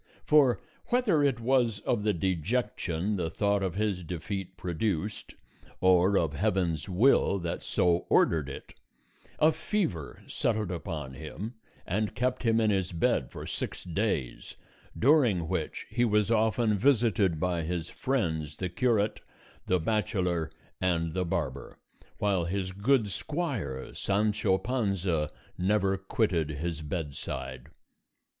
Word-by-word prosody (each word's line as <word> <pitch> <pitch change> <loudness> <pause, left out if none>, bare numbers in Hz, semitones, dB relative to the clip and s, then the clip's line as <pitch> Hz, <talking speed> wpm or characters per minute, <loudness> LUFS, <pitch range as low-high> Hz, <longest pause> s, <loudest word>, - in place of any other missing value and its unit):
For 140 -5 +5 0.3
whether 235 -11 +3
it 135 -5 +2
was 120 -3 +2
of 120 - 0
the 105 0 +2
dejection 95 +1 -1
the 85 -3 -1
thought 100 +4 +1
of 95 -2 -2
his 100 -3 -1
defeat 90 +2 -5
produced, 90 +3 -2 0.4
or 95 +1 +4
of 80 -3 +1
Heaven's 90 -1 0
will 100 +1 +4
that 85 -1 -3
so 85 -1 +1
ordered 75 -4 +3
it 70 - -9 0.6
a 155 - +5
fever 160 - -2
settled 110 -5 -1
upon 80 -6 -5
him 80 - -6 0.3
and 105 +3 -1
kept 125 +1 0
him 115 -2 +3
in 110 -1 +3
his 95 -2 0
bed 85 - +1
for - - -8
six - - -4
days, 85 - -2 0.4
during 120 - +4
which - - -3
he 120 - 0
was 105 -2 +2
often 110 -1 +2
visited 110 - +3
by 90 -1 0
his 85 0 -3
friends 80 - -1
the 90 - -2
curate, 110 +1 +1 0.5
the 90 - +3
bachelor, 90 -4 0 0.3
and 85 -3 +1
the 90 +1 0
barber, 75 -7 -3 0.4
while 95 -4 +1
his 95 +1 -2
good 105 +3 +2
squire 115 - -3
Sancho 105 -1 +1
Panza 95 - 0 0.3
never 95 +1 +2
quitted 95 -4 0
his 80 +2 -3
bedside. 75 -2 -5
95 Hz, 130 wpm, -29 LUFS, 85-110 Hz, 0.6 s, For